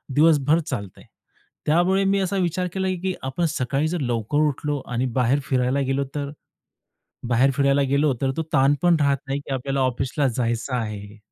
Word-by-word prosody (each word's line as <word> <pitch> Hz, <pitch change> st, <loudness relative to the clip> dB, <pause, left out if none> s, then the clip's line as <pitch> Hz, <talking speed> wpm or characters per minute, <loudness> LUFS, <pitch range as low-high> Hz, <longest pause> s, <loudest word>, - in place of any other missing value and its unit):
दिवसभर 155 Hz, 0 st, +4 dB
चालतंय. 125 Hz, -, -6 dB, 0.6 s
त्यामुळे 175 Hz, +5 st, +3 dB
मी 195 Hz, +1 st, +2 dB
असा 195 Hz, +1 st, -1 dB
विचार 180 Hz, 0 st, 0 dB
केला, 190 Hz, -1 st, -1 dB, 0.2 s
की 190 Hz, -1 st, 0 dB
आपण 135 Hz, +6 st, -1 dB
सकाळी 140 Hz, +2 st, -1 dB
जर 175 Hz, +1 st, -2 dB
लवकर 120 Hz, +1 st, -1 dB
उठलो 145 Hz, 0 st, -2 dB
आणि 125 Hz, +1 st, -1 dB
बाहेर 125 Hz, +3 st, +2 dB
फिरायला 130 Hz, 0 st, 0 dB
गेलो 140 Hz, +1 st, +1 dB
तर? 145 Hz, -1 st, -3 dB, 1.0 s
बाहेर 125 Hz, +3 st, +3 dB
फिरायला 140 Hz, 0 st, +2 dB
गेलो 140 Hz, 0 st, +2 dB
तर 135 Hz, -1 st, +1 dB
तो 160 Hz, -, 0 dB
ताणपण 145 Hz, +6 st, +4 dB
राहत 140 Hz, -1 st, +2 dB
नाही 135 Hz, +1 st, -1 dB
की 140 Hz, -1 st, -6 dB
आपल्याला 135 Hz, +1 st, -2 dB
ऑफिसला 130 Hz, +2 st, 0 dB
जायचं 120 Hz, +1 st, -1 dB
आहे. 105 Hz, -3 st, -5 dB
140 Hz, 165 wpm, -23 LUFS, 130-155 Hz, 1.0 s, दिवसभर